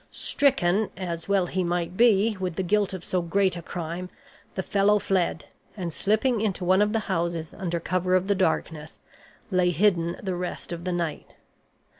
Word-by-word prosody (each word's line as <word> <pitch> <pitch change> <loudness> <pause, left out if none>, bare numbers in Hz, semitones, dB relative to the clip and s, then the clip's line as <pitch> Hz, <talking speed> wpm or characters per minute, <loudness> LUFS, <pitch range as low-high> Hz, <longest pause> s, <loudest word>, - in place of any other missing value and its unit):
Stricken, 215 -8 +2
as 170 -1 -5
well 195 -2 +3
he 185 +1 -1
might 175 0 -2
be, 220 -1 +4
with 180 -3 -3
the 190 - -1
guilt 205 +2 +1
of 185 -2 -6
so 185 - 0
great 185 +2 +1
a 170 - -5
crime, 175 +2 -5 0.5
the 190 - -2
fellow 205 +2 +3
fled, 185 -4 0 0.3
and, 175 -4 -4
slipping 220 +5 +1
into 195 -4 -1
one 185 +2 +4
of 210 0 +2
the 225 0 0
houses 170 -4 -2
under 175 -3 -3
cover 185 +2 0
of 185 0 +2
the 200 - +3
darkness, 160 -4 -1 0.5
lay 180 -1 +3
hidden 175 -2 +2
the 190 -2 -3
rest 180 0 -4
of 170 +1 -7
the 180 - -1
night. 170 -3 -4
185 Hz, 180 wpm, -26 LUFS, 170-200 Hz, 0.5 s, be